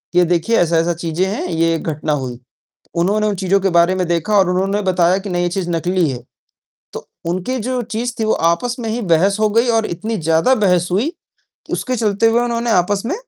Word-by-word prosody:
ये 180 0 +5
देखिए 175 +7 +1
ऐसा-ऐसा 170 0 +2
चीज़ें 170 +2 -2
हैं, 190 -2 -3
ये 165 -1 +1
घटना 155 -1 -2
हुई। 130 -4 -4 0.6
उन्होंने 200 +5 +1
उन 210 - 0
चीज़ों 195 +1 +1
के 195 0 +1
बारे 170 +2 +3
में 185 -1 -1
देखा 175 +5 0
और 190 -2 +3
उन्होंने 195 +3 0
बताया 185 -1 +2
कि 195 0 -7
नहीं 175 0 0
ये 175 - +1
चीज़ 175 0 -3
नकली 175 0 0
है। 125 -2 -6 0.7
तो - - -8 0.2
उनकी 185 +9 -2
जो 250 +2 -2
चीज़ 235 +1 -3
थी - - 0
वो 220 - +2 0.2
आपस 240 +9 -1
में 230 - -4
ही 225 +2 -2
बहस 190 +2 +2
हो 215 - +3
गई 230 +4 +2
और 220 - 0
इतनी 215 +6 -4
ज़्यादा 165 +8 +2
बहस 180 -6 +2
हुई 225 - +1 0.6
उसके 255 0 -2
चलते 215 -1 +1
हुए 230 +1 +2
उन्होंने 235 0 -1
आपस 195 0 +1
में 295 - -1
185 Hz, 210 wpm, -18 LUFS, 170-220 Hz, 0.7 s, ये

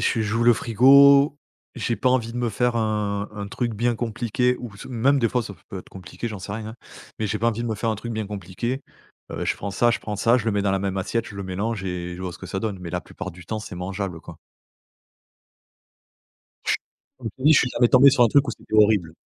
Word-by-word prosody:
j'ai 115 - +1
j'ouvre 110 +2 0
le 120 - +7
frigo, 140 +5 +6 0.4
j'ai 120 -1 -2
pas 130 - +2
envie 120 -3 +1
de - - -7
me 120 -1 -1
faire 120 +3 0
un 105 -2 -1
un 100 -1 -5
truc 120 +2 -2
bien 120 +3 +1
compliqué 120 +2 0
ou 120 -5 -8
s 100 - -10
même 130 +3 +2
des 115 -3 +2
fois, 125 - +1
ça 100 -3 -8
f - - -27
peut 95 - -5
être - - -12
compliqué, 95 +5 -7
j'en 105 -2 -6
sais 100 +1 -7
rien, 110 +1 -5
hein. 110 - -12 0.4
Mais 110 - -1
j'ai 105 +1 -2
pas 115 - +2
envie 115 0 -2
de 120 - -2
me 110 - -1
faire 110 +2 -2
un - - 0
truc 120 +3 -6
bien 110 -1 -3
compliqué. 105 +6 -4 0.5
Heu, - - -4
je - - 0
prends 100 - -5
ça 120 +5 +3
je 115 - 0
prends 105 -1 -5
ça, 115 +4 +3
je 120 - -2
le 110 - +1
mets 100 - +1
dans 100 -1 +1
la 95 - +1
même 95 0 -2
assiette, 115 +5 -1
je 100 - -10
le 100 - -4
mélange 100 +3 -3
et 90 -1 -4
je - - -10
vois 90 -1 -4
ce - - -12
que - - -9
ça 95 - -4
donne. 105 -3 -3
Mais 85 -2 -7
la 90 +1 -2
plupart 100 +1 -8
du 90 0 -14
temps, 110 - -3
c'est 105 - -8
mangeable, 95 -1 -4
quoi. - - -11 2.3
Ch - - +3 0.4
comme 120 -3 -6
je - - -45
t'ai 130 - -11
dit, 155 - +7
je 155 - +6
suis 125 - +1
jamais 120 - +3
tombé 130 +3 +7
sur 130 -2 +3
un - - +4
truc 140 +5 +4
où - - +1
c'était 110 - -8
horrible. 105 -6 +4
110 Hz, 270 wpm, -23 LUFS, 100-120 Hz, 2.3 s, le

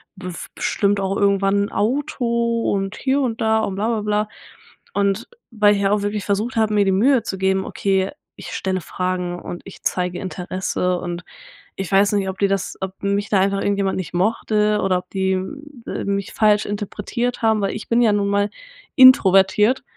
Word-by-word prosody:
bef 180 -2 -7
bestimmt 200 0 0
auch 195 0 -1
irgendwann 200 0 +2
'n - - -9
Auto“ 235 -1 0
und 195 0 -2
hier 275 +1 +1
und 230 -4 -2
da 220 0 +3
und 195 - -2
bla, 210 +3 -1
bla, 225 -2 0
bla. 210 0 0 0.7
Und, 200 +2 0 0.2
weil 210 -2 +4
ich 200 - -1
ja 195 0 +2
auch 205 -1 +1
wirklich 205 0 -2
versucht 210 +5 -1
habe, 220 -1 +2
mir 205 -1 +3
die 195 - +2
Mühe 240 +4 +3
zu 190 - -4
geben: 190 0 +1
„Okay, 190 -1 0 0.2
ich - - -10
stelle 185 -1 -2
Fragen 180 0 -3
und 175 - -7
ich 195 - -12
zeige 180 -1 -1
Interesse.“ 180 -1 -2
Und 175 0 -5 0.5
ich 195 -1 -5
weiß 200 +1 +4
nicht, 195 -2 0
ob 190 - -6
die 200 - +3
das 195 -1 -2
ob 190 0 -6
mich 200 +1 0
da 200 - +3
einfach 195 +1 +1
irgendjemand 200 -1 0
nicht 185 -3 -5
mochte 210 +2 +1
oder 185 -1 +2
ob 180 - -16
die, 190 -1 0 0.5
äh, - - -4
mich 200 0 -2
falsch 210 -1 +3
interpretiert 210 +4 -3
haben, 220 -2 +2
weil 195 - 0
ich 215 - -8
bin 235 +1 +3
ja 220 -3 +4
nun 205 -1 +1
mal 205 +1 +1 0.5
introvertiert 210 - +6
200 Hz, 190 wpm, -21 LUFS, 190-215 Hz, 0.7 s, introvertiert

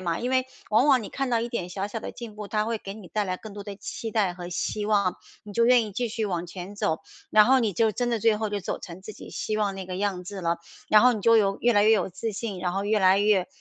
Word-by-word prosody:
嘛。 170 -3 -1
因 250 +2 -2
为 260 0 +2 0.2
往 230 +6 +4
往 265 -3 +5
你 - - -7
看 270 -1 -2
到 235 - +2
一 235 - -2
点 185 -7 -3
小 195 +2 -3
小 220 +2 -5
的 - - -5
进 230 -3 -9
步， 210 -1 -7
他 210 -1 0
会 225 0 -2
给 195 -1 -8
你 210 -4 -11
带 210 +4 -1
来 185 -1 -2
更 215 +1 -10
多 205 0 -7
的 200 -1 -8
期 225 +2 -6
待 205 -5 +1
和 175 -1 -7
希 205 +3 -2
望， 200 -4 +2 0.3
你 210 - -9
就 230 +3 +3
愿 240 -2 +5
意 205 - -8
继 240 +3 -1
续 220 0 -2
往 175 -3 -2
前 185 +3 -8
走， 160 -5 -1 0.3
然 215 0 +7
后 260 +2 +5
你 215 -4 +1
就 220 +3 +2
真 245 +2 -1
的 230 - +1
最 220 0 +3
后 220 -1 -1
就 205 -1 -3
走 - - -3
成 180 +1 -9
自 215 - -8
己 - - -11
希 215 - -3
望 200 -2 0
那 190 - -5
个 185 - -5
样 190 -2 -2
子 195 +1 -6
了。 170 -1 0 0.3
然 215 - +7
后 250 0 +6
你 215 - -3
就 230 +2 +5
有 195 -2 +2
越 240 0 +4
来 205 0 +5
越 220 - +5
有 195 -3 +2
自 215 +5 -4
信， 205 -2 -4
然 180 0 -2
后 195 +1 -2
越 210 +1 +2
来 190 0 +5
越 205 -3 +3
210 Hz, 325 characters per minute, -26 LUFS, 190-225 Hz, 0.3 s, 然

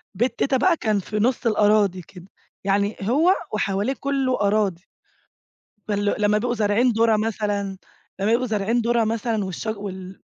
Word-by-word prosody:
بيت 240 +6 -1
تيتة 270 -1 +2
بقى 335 +4 +3
كان 215 -2 0
في 210 +3 -4
نص 240 +3 0
الأراضي 210 -4 +3
كده، 180 +1 -14 0.4
يعني 200 +2 0
هو 295 - +3 0.2
وحواليه 205 +4 0
كلّه 270 -4 0
أراضي. 200 -3 0 1.0
فال 205 -1 0
لمّا 210 0 +3
بيبقوا 240 +2 -1
زارعين 220 +3 +2
دُره 225 -1 +3
مثلًا، 205 -3 -2 0.4
لما 200 +3 0
بيبقوا 250 +2 +1
زارعين 220 +2 0
دُره 235 0 +2
مثلًا 220 -1 -1
والشج 210 +4 -4
وال 190 -2 -8
215 Hz, 150 wpm, -23 LUFS, 200-235 Hz, 1.0 s, بقى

